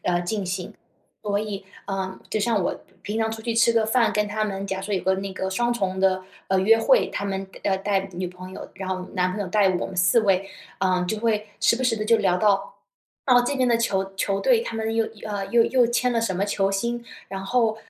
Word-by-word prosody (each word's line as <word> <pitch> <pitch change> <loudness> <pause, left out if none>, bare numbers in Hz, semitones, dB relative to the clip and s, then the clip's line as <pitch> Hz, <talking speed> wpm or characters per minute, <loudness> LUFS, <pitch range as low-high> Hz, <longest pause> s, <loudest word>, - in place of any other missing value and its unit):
呃， 175 -1 +2
进 200 +3 -2
行。 185 0 -4 0.5
所 205 -1 0
以， 205 -2 -5 0.2
呃， 190 -1 -4
就 - - 0
像 215 -2 +1
我 - - 0 0.3
平 210 +2 -3
常 225 0 +1
出 220 0 -6
去 230 - -1
吃 230 +1 +4
个 225 -1 +3
饭， 230 +1 +2
跟 210 0 0
他 215 +1 -1
们 195 -2 -3
假 190 -1 -3
说 205 +1 -2
有 185 - -1
个 190 - +2
那 195 0 -4
个 190 0 -3
双 240 +5 +1
重 190 -5 -2
的， 190 -1 +2 0.2
呃， 190 - +1
约 225 +4 +5
会， - - +4
他 200 - -4
们 195 -1 -2 0.2
要 195 -1 +2
带 195 0 0
女 180 0 -3
朋 185 +1 -11
友， - - -9
然 190 0 -6
后 185 -1 -4
男 185 -1 +1
朋 205 - -4
友 200 - -2
带 205 0 +3
我 180 - -1
们 190 - -9
4 180 +6 +4
位， 195 -2 +1 0.3
呃， 185 -1 +1
就 220 - -1
会 215 -1 0
时 - - +4
不 250 - -3
时 245 -3 +2
地 215 - -2
就 230 +1 +4
聊 190 -4 +2
到， 200 -1 +1 0.5
哦， 245 -2 +6
这 275 +3 -1
边 255 - +2
的 235 -1 +4
球 195 -4 -1
球 195 0 0
队 485 - +3
他 345 - -5
们 225 0 -2
又 225 0 +2 0.2
呃， 205 -2 -2
又 235 -1 +4
又 245 +1 +3
签 245 +1 +1
了 230 - +1
什 225 -4 0
么 190 +2 0
球 195 -1 0
星， 235 +4 -2 0.2
然 195 0 -6
后， 225 0 +2
205 Hz, 260 characters per minute, -24 LUFS, 190-225 Hz, 0.5 s, 哦